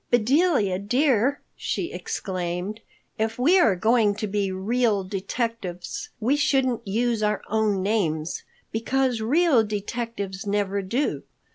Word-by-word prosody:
"Bedelia, 240 - +3
dear," 255 +4 +2
she - - -3
exclaimed, 185 +2 -4 0.4
"if 220 +1 -1
we 325 +10 +5
are 220 - +4
going 220 +1 +3
to 215 - -3
be 200 -1 -1
real 210 +2 +1
detectives, 200 - -4
we 240 +6 +2
shouldn't 265 -6 +1
use 230 +2 0
our 210 -1 0
own 210 -3 +1
names, 170 -7 0 0.3
because 250 +1 0
real 280 +1 +4
detectives 205 -2 -4
never 200 -1 0
do. 235 +10 -1
220 Hz, 120 wpm, -25 LUFS, 195-245 Hz, 0.4 s, we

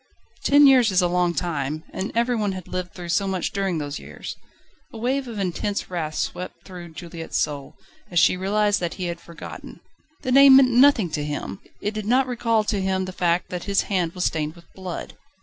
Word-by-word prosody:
Ten 285 +1 +6
years 255 -4 +6
is 185 -1 +3
a - - +3
long 175 -1 +1
time, 155 -2 -2
and 190 - -3
every 235 +1 +2
one 205 -3 0
had 185 -2 -8
lived 180 -1 -5
through 175 -2 -7
so 190 +4 +1
much 190 -2 -1
during 195 -3 -1
those 145 -2 -4
years! 75 +2 -8 0.6
A - - -9
wave 260 +4 -1
of 230 -3 -7
intense 195 +1 -2
wrath 155 -3 -3
swept 180 - -4
through 175 -3 -10
Juliette's 165 -1 -5
soul, 145 -2 -2 0.3
as 175 - -4
she 170 - +5
realised 205 +2 +1
that 175 -2 -3
he 185 - -5
had 170 -1 -4
forgotten. 170 -1 -10 0.4
The 255 - -1
name 275 0 +9
meant 265 -2 +7
nothing 245 - +5
to 150 -1 -2
him! 150 +5 -4 0.2
It 210 - -2
did 215 -1 -4
not 255 +3 +4
recall 230 -3 +1
to 210 -2 -1
him 190 0 0
the 185 - -6
fact 175 -1 0
that 180 -1 -4
his 200 -1 +2
hand 175 -3 +1
was 180 - -2
stained 155 0 -1
with 170 -1 -16
blood. 185 -2 -6
185 Hz, 210 wpm, -23 LUFS, 170-215 Hz, 0.6 s, name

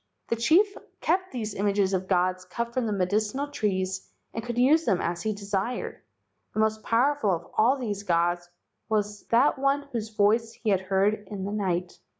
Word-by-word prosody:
The 230 - +2
chief 345 - +4 0.2
kept 370 +3 0
these 220 -5 -4
images 200 -1 +1
of 185 0 -1
gods 185 0 +1
cut 235 +6 -4
from 250 -2 0
the - - -1
medicinal 210 +8 0
trees 190 -8 -2 0.2
and 225 - -4
could 240 0 -4
use 290 +6 +5
them 195 - +2
as 170 0 -2
he 220 - 0
desired. 200 +3 -3 0.5
The - - -1
most 220 0 +1
powerful 245 +1 +2
of 170 -2 0
all 245 +6 +4
these 210 -6 -3
gods 175 -2 +1 0.4
was 210 -1 -1
that 250 +4 +3
one 275 +1 +2
whose 225 -2 -3
voice 220 +2 +2
he 225 -2 -1
had 190 -2 +2
heard 195 +2 +1
in 195 -2 -4
the 200 - -3
night. 180 -4 -2
210 Hz, 180 wpm, -27 LUFS, 190-235 Hz, 0.5 s, use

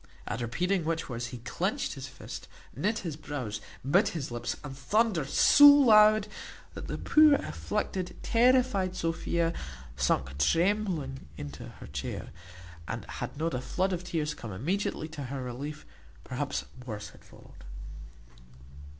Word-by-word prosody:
At 115 - -3
repeating 180 +10 0
which 165 -1 -2
words 120 -1 -3
he 125 +1 -7
clinched 120 - -2
his - - -7
fist, - - -9 0.3
knit 210 - 0
his 160 -4 -3
brows, 130 -9 -5 0.3
bit 190 +9 +4
his 135 -5 -4
lips, 120 0 -3
and 140 -2 -7
thundered 190 - +1
so 290 - +8
loud, 215 -7 +7 0.5
that - - -7
the - - -3
poor 305 -2 +6
afflicted, 185 -8 -3
terrified 235 -6 +3
Sophia 165 0 0 0.4
sunk 65 +1 0
trembling 170 - +1
into 70 0 -7
her - - -12
chair, 70 -1 -5 0.6
and, - - -4
had - - -6
not 165 +2 -1
a 125 - -2
flood 185 +9 -1
of 180 0 -3
tears 155 -4 -2
come 115 -7 -8
immediately 155 - -2
to 150 -3 -6
her 130 +1 -4
relief, 140 +5 -6 0.4
perhaps 65 - -3 0.2
worse 110 -4 -6
had - - -18
followed. - - -16
160 Hz, 140 wpm, -29 LUFS, 125-200 Hz, 0.6 s, so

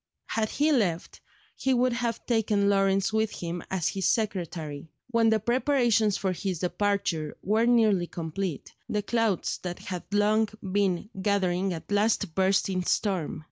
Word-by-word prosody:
Had 220 -1 0
he 300 +3 +1
left, 190 - 0 0.3
he 265 -1 +1
would 250 0 +2
have 235 -1 -2
taken 215 -4 +1
Lawrence 195 0 +2
with 220 -1 +1
him 170 0 -4
as 185 -4 0
his 190 -2 -1
secretary. 165 -8 -2 0.2
When 230 -1 +4
the 220 0 +3
preparations 235 -3 +2
for 190 - -1
his 185 0 -3
departure 180 -4 -1
were 220 +4 +2
nearly 215 -7 +3
complete, 165 0 -5 0.2
the 210 -3 -1
clouds 225 -3 0
that 175 -1 -5
had 180 -1 -7
long 210 +1 +3
been 195 +1 0
gathering 190 -2 +1
at 165 +3 -7
last 205 -3 +1
burst 190 +2 +2
in 185 -2 -1
storm. 185 -3 -1
200 Hz, 150 wpm, -27 LUFS, 180-220 Hz, 0.3 s, When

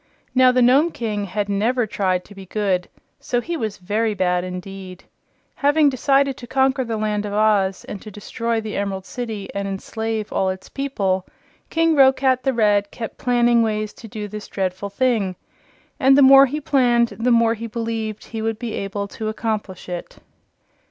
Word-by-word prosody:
Now, 255 -1 +6
the 250 0 +3
Nome 275 +7 +5
King 215 -8 -3
had 205 +2 -2
never 225 +5 +1
tried 185 -3 -1
to 205 - -14
be 195 -1 -11
good, 190 -3 -1 0.3
so 245 - -1
he 340 +8 -4
was 220 -8 -3
very 210 +4 -1
bad 180 -2 +1
indeed. 185 0 -8 0.5
Having 290 +1 +3
decided 275 +1 +2
to 240 - -10
conquer 265 +1 +2
the 225 -2 -3
Land 210 -1 -1
of 205 -1 -5
Oz 205 -3 +2
and 200 - -7
to 215 - -9
destroy 230 +3 -3
the 215 -1 -5
Emerald 195 -1 -3
City 220 -4 -5
and 200 0 -3
enslave 220 +2 -4
all 190 - +1
its 190 0 -6
people, 195 -10 -1 0.4
King 330 0 +2
Roquat 265 -2 +4
the 270 - +1
Red 205 -4 +2
kept 225 +1 -7
planning 240 -1 +3
ways 215 -1 -1
to 230 - -12
do 210 0 -6
this 210 0 -8
dreadful 190 +1 -3
thing, 205 -4 0 0.6
and 270 0 +5
the 285 - +7
more 270 +1 +8
he 295 +4 -3
planned 245 -5 +3
the 235 +2 -2
more 230 -1 +4
he 230 +1 -6
believed 225 -2 -4
he 225 -1 -6
would 225 0 -1
be 230 -1 -5
able 200 +1 -3
to 220 +1 -5
accomplish 215 -4 -4
it. 175 -1 -6
220 Hz, 180 wpm, -21 LUFS, 200-250 Hz, 0.6 s, more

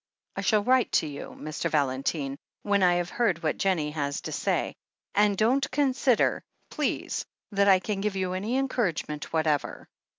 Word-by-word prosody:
"I - - -2
shall 215 -2 +2
write 255 +1 +3
to - - +3
you, 145 -2 -7
Mr. 155 +1 -3
Valentine, 135 0 0 0.3
when 200 -1 +2
I 180 -1 +5
have 175 0 -1
heard 190 -8 0
what 155 - -1
Jennie 170 -6 +1
has 145 -2 -2
to - - -6
say. - - -1 0.4
And 205 -1 +3
don't 260 +6 +2
consider, 265 -4 +2 0.3
please, - - -2 0.3
that 200 0 +2
I 195 -1 +7
can 195 +1 -3
give 210 -1 -1
you 185 -1 -1
any 210 +7 -1
encouragement 185 - -2
whatever. 155 -3 0
190 Hz, 165 wpm, -27 LUFS, 155-215 Hz, 0.4 s, I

